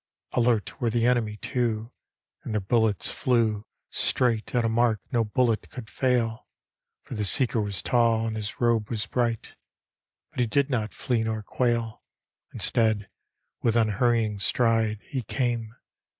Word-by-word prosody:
Alert 120 -3 +1
were 120 - +2
the 115 +1 +1
enemy, 120 -4 +1
too, 115 -2 -2 0.5
And 110 - -4
their - - +2
bullets 110 0 +1
flew 110 -4 +1 0.2
Straight 120 -2 +1
at 120 -1 +2
a - - +3
mark 115 -1 +2
no 120 -3 +2
bullet 115 0 0
could 120 -4 -9
fail; 120 -3 0 0.6
For - - -9
the 105 - -2
seeker 115 +3 +2
was 100 -5 -3
tall 115 -2 +2
and 110 -1 -2
his 105 -2 -5
robe 115 -3 +2
was 110 -3 -2
bright; 115 0 -1 0.8
But - - -8
he 120 - +2
did 140 +5 +1
not 110 -4 -1
flee 125 -4 0
nor 110 -1 -2
quail. 115 -1 -1 0.5
Instead, 110 -3 +1 0.5
with 115 -2 +1
unhurrying 110 -1 +2
stride 110 -1 +1
He 130 - -4
came. 115 -1 -2
115 Hz, 150 wpm, -26 LUFS, 110-120 Hz, 0.8 s, a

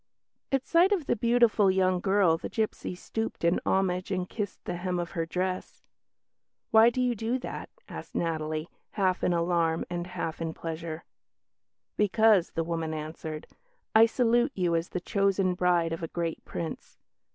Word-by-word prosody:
At 270 -1 +1
sight 345 +4 +4
of 365 -8 +1
the - - +1
beautiful 235 -3 +3
young 185 -1 +2
girl 190 -3 +3
the 165 - -6
gipsy 215 -4 -2
stooped 225 +3 -4
in 170 +1 +3
homage 185 -1 +1
and 185 -2 -1
kissed 205 -2 -5
the 175 - -3
hem 180 0 -2
of 175 -1 -3
her 165 -3 -2
dress. 185 +2 -3 0.9
"Why 225 +1 +7
do 240 - -4
you 250 -1 +2
do 230 +3 -1
that?" 260 - -6 0.2
asked - - -9
Natalie, 155 -1 -2 0.3
half 185 -3 +1
in - - +3
alarm 170 -1 +1
and 175 0 -3
half 165 -2 -4
in 160 -1 -3
pleasure. 165 0 -5 0.9
"Because," 210 -2 +4
the 165 - +1
woman 165 -1 -3
answered, 155 0 -6 0.5
"I 225 +1 +7
salute 240 +3 +2
you 175 -3 +1
as 165 +1 -1
the 180 - -3
chosen 195 -2 +1
bride 175 -2 +2
of 165 - -5
a 165 - -3
great 165 0 -3
Prince. 165 -2 -6
180 Hz, 165 wpm, -28 LUFS, 165-215 Hz, 0.9 s, Why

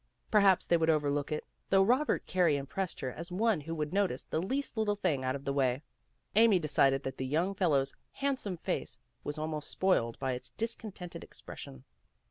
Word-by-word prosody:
Perhaps 200 -3 +5
they 170 - +3
would 165 0 +1
overlook 145 -2 +1
it, 150 - -2 0.2
though 195 0 +5
Robert 255 +8 +2
Carey 175 -6 +3
impressed 170 +7 -3
her 130 - -2
as 170 +7 -6
one 210 -2 +2
who 165 +3 -5
would 150 +1 -3
notice 195 -10 +1
the 160 - -2
least 265 +10 -2
little 215 -2 +1
thing 165 -10 0
out 130 +1 0
of 140 0 -7
the 140 - 0
way. 130 0 +1 0.5
Amy 220 -2 +6
decided 140 -4 +2
that 135 - -4
the - - -3
young 165 +8 +1
fellow's 145 -8 +2 0.2
handsome 265 -9 -2
face - - -3 0.3
was 145 - -4
almost 155 -1 -2
spoiled 120 -12 +1
by 130 - -1
its 125 0 -5
discontented 215 -6 -3
expression. 65 -1 -10
165 Hz, 185 wpm, -31 LUFS, 140-195 Hz, 0.5 s, Amy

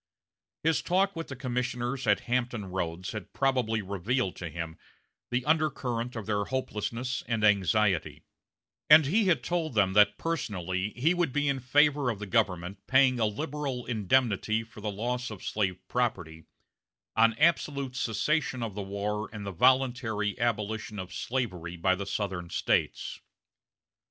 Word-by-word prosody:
His 160 0 +2
talk 190 +2 +1
with 165 0 -5
the 135 - -6
commissioners 125 0 -2
at - - +4
Hampton 120 -3 -1
Roads 90 -1 -3
had 105 - -7
probably 125 -5 +1
revealed 100 +3 -1
to 85 - -5
him 80 -1 -6 0.5
the 125 +1 -1
undercurrent 130 -6 0
of 110 -3 -5
their 105 -1 0
hopelessness 125 0 -3
and 115 -2 -1
anxiety; 100 -2 +2 0.7
and 155 0 +9
he 205 +10 +2
had 180 -4 +2
told 165 -6 -2
them 95 -2 +3
that 105 0 +5
personally 95 - -2
he 145 +9 +2
would 175 -5 0
be 145 +2 0
in 140 -1 +1
favor 145 +1 +3
of 115 - -2
the 105 - -6
government 95 -3 0
paying 130 -1 +4
a 110 - +3
liberal 135 +2 -3
indemnity 110 -1 +1
for 115 -1 -13
the 105 - -2
loss 125 +5 -2
of 105 -4 -9
slave 95 -4 -1
property, 85 -10 -2 0.7
on 115 0 +4
absolute 140 -5 +1
cessation 130 +2 0
of 110 -3 -4
the 105 - -4
war 100 +2 -3
and 105 -2 -7
the 100 - -3
voluntary 115 -2 +2
abolition 110 -2 -1
of 95 -1 -6
slavery 90 -9 -3
by 95 +2 +2
the 95 +1 -4
Southern 95 -3 -3
States. - - -1
115 Hz, 150 wpm, -29 LUFS, 100-130 Hz, 0.7 s, and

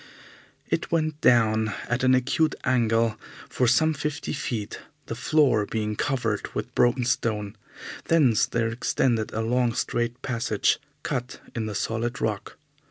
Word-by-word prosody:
It - - -2
went 155 -2 0
down 110 -3 +3
at 120 +2 -1
an 130 0 +5
acute 155 +5 +1
angle 115 -3 +2 0.3
for 125 - 0
some 155 +7 +4
fifty 145 0 -3
feet, 120 -7 -4 0.3
the - - -5
floor 125 -3 +2
being 105 -1 -2
covered 115 -6 -2
with - - -4
broken 120 0 +2
stone. 105 -3 -1 0.5
Thence 140 -9 +3
there 115 -1 0
extended 115 -1 0
a 110 - -2
long, 120 0 +1
straight 120 +1 -1
passage 115 -4 0 0.2
cut 125 -3 -3
in 110 -2 -3
the 105 - -5
solid 115 +5 -2
rock. 105 -3 -3
120 Hz, 140 wpm, -25 LUFS, 110-130 Hz, 0.5 s, an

